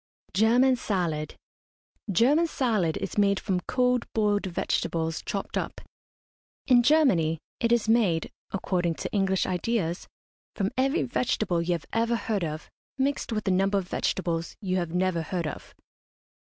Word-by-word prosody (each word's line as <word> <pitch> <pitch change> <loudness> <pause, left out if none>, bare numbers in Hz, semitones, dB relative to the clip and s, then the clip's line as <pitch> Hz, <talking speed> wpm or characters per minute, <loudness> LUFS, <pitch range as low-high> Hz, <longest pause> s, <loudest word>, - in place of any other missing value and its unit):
GERMAN 245 +5 +4
SALAD. 170 -9 -2 0.8
German 280 - +4
salad 215 - 0
is - - -3
made 200 -1 +3
from 190 -3 -1
cold 250 -1 +1
boiled 205 -2 +1
vegetables 165 -2 -1
chopped 200 - -3
up. - - -5 0.9
In 250 -2 +6
Germany, 235 - +3 0.2
it 230 -1 +1
is 235 -2 +2
made, 210 -8 +2 0.2
according 180 -3 -1
to - - -5
English 195 -2 +1
ideas, 180 -1 -1 0.5
from 195 -1 -1
every 270 +5 +1
vegetable 215 -8 0
you 175 +1 0
have 170 -2 -4
ever 230 +1 +1
heard 215 -4 -1
of, 155 -1 -4 0.3
mixed 275 -1 -1
with 215 -2 -2
a - - +3
number 195 +2 +2
of 190 -2 -3
vegetables 170 -3 -2
you 185 -3 -1
have 175 -2 -1
never 180 -1 0
heard 170 +2 -3
of. 150 - -7
195 Hz, 145 wpm, -27 LUFS, 175-235 Hz, 0.9 s, In